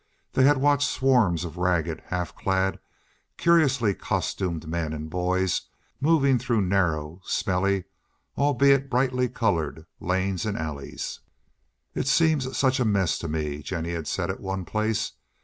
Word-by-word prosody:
They 130 - +4
had 145 0 +5
watched 145 +1 +3
swarms 110 -11 +2
of 85 +1 -8
ragged, 85 -3 0
half 90 -1 -3
clad, 95 0 0 0.6
curiously 140 -11 +3
costumed 85 -4 -2
men 80 -1 -2
and 80 0 -6
boys 90 +1 0 0.4
moving 140 -3 +3
through 120 -3 +1
narrow, 85 -3 0
smelly, 95 -1 0 0.5
albeit 140 -1 +3
brightly 125 0 +1
colored, 80 - -1
lanes 95 +1 -1
and 105 -2 -2
alleys. 75 -3 -5 0.7
"It - - -2
all 150 - +4
seems 155 -6 +1
such 130 0 +2
a - - +3
mess 100 -5 +1
to 85 - -4
me," 75 -2 -3
Jennie 85 +2 -3
had 80 -2 -4
said - - -1
at - - -7
one 95 -1 -4
place. 110 +2 -1
95 Hz, 145 wpm, -26 LUFS, 85-130 Hz, 0.7 s, had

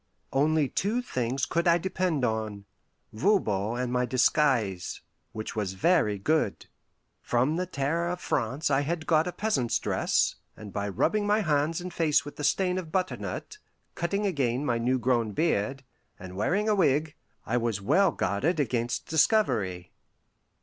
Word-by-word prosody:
Only 150 +1 +2
two 220 - -1
things 130 - -1
could 170 +7 0
I 170 0 +6
depend 175 -6 -1
on: 110 -3 -3 0.5
Voban 110 - +1
and 125 -1 -2
my 125 0 +1
disguise, 125 -7 +1 0.3
which 110 +1 -6
was 100 -3 -2
very 105 - +2
good. 125 0 0 0.6
From 125 +6 +1
the 180 +1 -2
Terror 165 +2 -1
of 180 0 -3
France 135 +1 -1
I 135 0 +3
had 160 +2 -3
got 160 +1 +3
a - - -2
peasant's 150 - 0
dress, - - +1 0.2
and 105 -2 -10
by 100 0 -2
rubbing 205 - +1
my 210 +1 +3
hands 155 -2 +1
and 180 0 -7
face 155 -4 +2
with 145 - -9
the 150 - -5
stain 185 +4 +1
of 165 -4 -8
butternut, 190 - -3 0.3
cutting 200 +4 -1
again 140 -7 0
my 120 -4 0
new 125 +3 +1
grown 120 -3 0
beard, 135 - 0 0.3
and 95 -1 -10
wearing 185 - 0
a 215 - +3
wig, 155 -5 +2 0.3
I 120 - 0
was 115 -4 -1
well 190 - +3
guarded 135 - 0
against 120 -4 -1
discovery. 125 - +1
140 Hz, 155 wpm, -27 LUFS, 115-175 Hz, 0.6 s, I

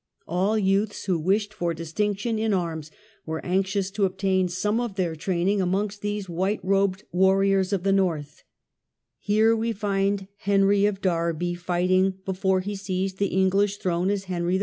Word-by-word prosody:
All 190 +6 +1
youths 200 +1 0
who 180 -4 +1
wished 205 +5 0
for 175 -5 -2
distinction 205 +7 -2
in 220 -2 +1
arms 160 -4 -3 0.3
were 160 0 -5
anxious 190 +1 0
to 205 0 +1
obtain 190 0 +1
some 210 +5 0
of 240 -5 -3
their 175 -4 -1
training 185 +4 0
amongst 195 +3 -1
these 205 -1 -3
white 190 +5 -1
robed 195 0 +1
warriors 190 +1 +3
of 195 -3 -1
the 195 - +2
North; 165 -7 -1 0.8
here 220 +2 +3
we 225 +1 -1
find 195 -2 -1
Henry 200 0 +3
of 200 -1 -3
Derby 170 -1 0
fighting, 185 +2 +1
before 190 0 +1
he 205 +2 -4
seized 190 -1 -3
the 200 - +2
English 195 +2 +2
throne 180 0 0
as 200 -1 -1
Henry 180 -1 -1
IV. - - +1
190 Hz, 165 wpm, -25 LUFS, 180-205 Hz, 0.8 s, warriors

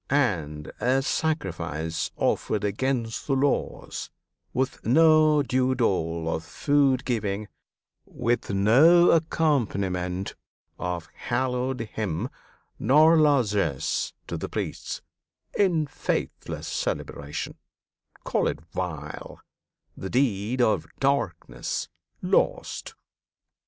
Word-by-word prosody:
And 80 - 0
a 130 +2 +2
sacrifice 85 - -2
Offered 105 -1 0
against 115 +2 -1
the 135 - +2
laws, 140 +1 -1 0.4
with 130 +1 -2
no 155 +2 +5
due 130 0 +1
dole 85 -8 0
Of 80 0 -1
food 135 - +2
giving, 105 -4 -1 0.6
with 120 0 -1
no 135 - +6
accompaniment 100 - 0 0.5
Of 90 -2 -3
hallowed 130 0 -1
hymn, 105 -1 -3 0.5
nor 155 +5 +6
largesse 120 - +2
to - - -4
the - - -5
priests, - - -4 0.5
In 175 -6 +3
faithless - - -3
celebration, 70 +1 -4 0.6
call - - +1
it - - -2
vile, 75 -5 -5 0.6
The 95 - -6
deed 120 -1 +1
of 110 - +1
"Darkness!" 135 - -1 0.3
lost! - - 0
120 Hz, 90 wpm, -26 LUFS, 90-140 Hz, 0.6 s, no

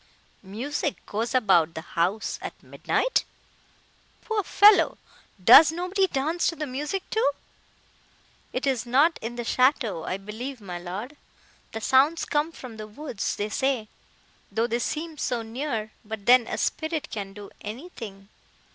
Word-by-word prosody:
"Music 255 +9 -4
goes 225 +4 -2
about 175 -9 +3
the 160 - -4
house 180 +6 -1
at - - -8
midnight! - - 0 1.0
Poor 445 -2 0
fellow!—does 320 - +5
nobody 365 +3 0
dance 315 +3 0
to 335 - 0
the 310 - -3
music, 295 +8 -4
too?" 440 -9 +3 1.2
"It 255 - -2
is 255 -3 0
not 285 +7 +3
in 230 +2 -5
the 240 - -4
château, 245 - +1
I 185 - -1
believe, 225 +7 -7
my 180 -4 -7
Lord; 200 +11 -6 0.5
the 225 - -5
sounds 275 +7 +3
come 300 +2 0
from 250 -8 -10
the 215 0 -7
woods, 230 -1 -4
they 205 +1 -3
say, 255 -2 -1 0.6
though 225 +3 +1
they 235 0 -1
seem 310 +4 -4
so 240 -3 -1
near;—but 220 -4 -5
then 245 -1 +6
a - - -3
spirit 315 -1 -2
can 195 -2 -5
do 205 0 -10
anything!" 215 - -8
245 Hz, 140 wpm, -26 LUFS, 210-300 Hz, 1.2 s, then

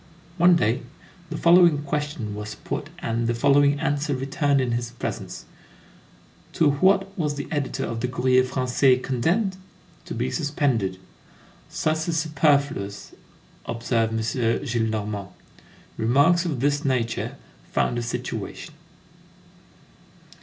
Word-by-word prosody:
One 175 +1 +6
day, 115 -6 +1 0.5
the 165 - -4
following 170 -4 +5
question 145 -7 -3
was 105 0 -6
put - - -5
and 115 0 -1
the 120 - 0
following 140 +3 +4
answer 145 0 0
returned 140 +2 +1
in 130 -2 0
his 120 0 -2
presence: 125 - -6 1.1
"To 150 -3 +3
what 195 +6 +2
was 150 -3 0
the 145 - -5
editor 145 -3 -2
of 115 - -4
the 125 - 0
Courrier 130 0 +3
Français 130 0 +2
condemned?" 180 - 0 0.5
"To - - -6
be 65 - -1
suspended." 125 - 0 0.7
"Sus 160 +1 -1
is 165 - 0
superfluous," 140 -9 0 0.5
observed 115 -1 0
M. 110 - 0
Gillenormand.22 110 -4 -1 0.7
Remarks 145 +10 +3
of 145 -8 -2
this 145 +1 +1
nature 125 -4 -1 0.4
found 120 - +1
a - - -2
situation. 115 - -5
135 Hz, 120 wpm, -24 LUFS, 115-150 Hz, 1.1 s, One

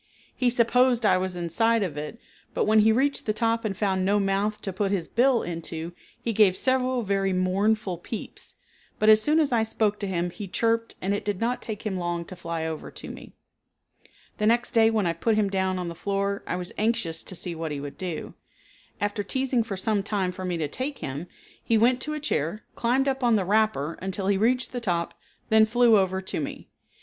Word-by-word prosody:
He 250 - +2
supposed 245 0 +3
I 185 - +4
was 185 -1 -2
inside 205 +7 +1
of 170 -7 -3
it, 150 +9 -5 0.4
but - - +2
when 215 +1 +5
he 220 +1 +5
reached 270 +4 +1
the 215 - +2
top 230 +1 0
and 200 -4 -2
found 190 -3 +1
no 200 +2 +3
mouth 200 +2 0
to 195 - -3
put 195 +2 0
his 185 -5 -1
bill 245 0 +3
into, 165 -1 -5 0.3
he 230 - -2
gave 200 -3 +4
several 255 -1 +1
very 195 -1 0
mournful 190 +1 +1
peeps, 215 +5 -7 0.4
but 215 - +3
as 215 0 +7
soon 300 +6 +3
as 300 -4 +2
I 235 -2 +3
spoke 220 -1 0
to 200 - -3
him 175 -2 -1
he 205 +2 -7
chirped 230 +4 0
and 195 +2 +1
it 205 - -2
did 205 -3 -2
not 240 +2 -1
take 220 0 -6
him 195 -3 -1
long 175 -1 -2
to 185 - -9
fly 170 -2 -4
over 160 -1 -5
to - - -9
me. - - -11 1.1
The 210 - +2
next 235 +1 +2
day 225 -1 +5
when 220 -3 +1
I 170 - +1
put 215 +7 +1
him 205 -2 +1
down 190 -1 0
on 180 -1 -3
the 170 - -4
floor 200 +2 -2
I - - -1
was 180 0 -4
anxious 210 -7 0
to 185 - -8
see 175 0 -4
what 160 -1 -4
he 145 - -3
would 140 0 -8
do. 180 -4 -5 0.7
After 205 +1 -1
teasing 260 +3 0
for 215 -4 -4
some 205 +1 0
time 195 -2 -1
for 185 +1 -8
me 180 -2 -1
to 155 -2 -1
take 260 - -4
him, 140 +6 -5 0.4
he 225 - +2
went 245 +3 +3
to 305 +2 -3
a - - -3
chair, 210 - -2
climbed 255 +4 +1
up 270 -1 -1
on 235 -2 +4
the 195 -3 +1
wrapper 205 -7 +1
until 190 +1 -3
he 200 - +3
reached 250 +4 +1
the 245 - -4
top, 175 -6 -1 0.4
then 220 0 +6
flew 235 0 +5
over 190 -1 +1
to 190 - -3
me. 145 - -6
205 Hz, 220 wpm, -26 LUFS, 185-230 Hz, 1.1 s, as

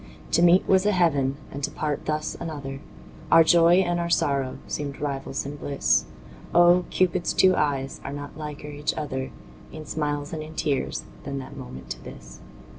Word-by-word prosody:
To - - +3
meet 175 +2 +5
was 190 +1 +4
a - - +4
heaven 140 -7 +2
and 140 +1 -7
to - - +1
part 150 -2 -3
thus 155 0 -1
another, 145 -5 -5 0.5
Our 165 - +8
joy 170 +2 +6
and 175 -1 0
our 170 0 -1
sorrow 140 -5 +1
seemed 140 -2 -4
rivals 140 -2 -3
in 145 +1 -6
bliss; 140 -1 +1 0.5
Oh! 175 +1 +6
Cupid's 185 -1 +1
two 185 -1 +5
eyes 135 -2 -1
are 135 - -5
not 145 0 -7
liker 150 -1 -7
each 145 0 -2
other 130 -3 -3 0.4
In 155 -1 -8
smiles 145 -1 -3
and 155 - -3
in 155 +1 -9
tears 140 -4 -1 0.2
than 140 -1 -4
that 135 - -7
moment 65 0 -9
to - - -6
this. 60 0 -11
150 Hz, 180 wpm, -25 LUFS, 140-170 Hz, 0.5 s, Our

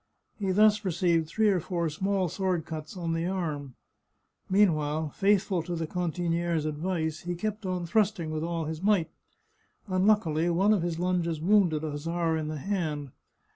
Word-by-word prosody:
He 195 -2 -1
thus 210 +2 +4
re 190 - 0
ceived 170 -1 +1
three 215 +6 +2
or 190 -3 +2
four 170 0 -2
small 190 +4 0
sword 180 -1 -1
cuts 155 +3 -7
on 165 -2 -2
the 165 +1 -1
arm. 150 -8 -3 0.7
Mean 195 -2 +5
while, 155 0 -2
faithful 195 -1 +2
to 175 +2 -4
the 165 -1 -2
cantiniere's 170 -1 -1
advice, 160 0 -2
he 175 0 -4
kept 210 +2 -3
on 180 -1 -2
thrusting 190 -3 +1
with 155 0 -2
all 165 -1 -2
his 160 +1 -5
might. 200 -4 +2 0.7
Unluckily 185 -4 +2
one 190 +5 +3
of 200 - +1
his 170 -1 -2
lunges 175 -2 0
wounded 175 -3 +3
a 155 - -2
hussar 165 +2 -1
in 155 -1 -2
the 155 0 -4
hand. 150 -5 -2
170 Hz, 175 wpm, -28 LUFS, 160-190 Hz, 0.7 s, Mean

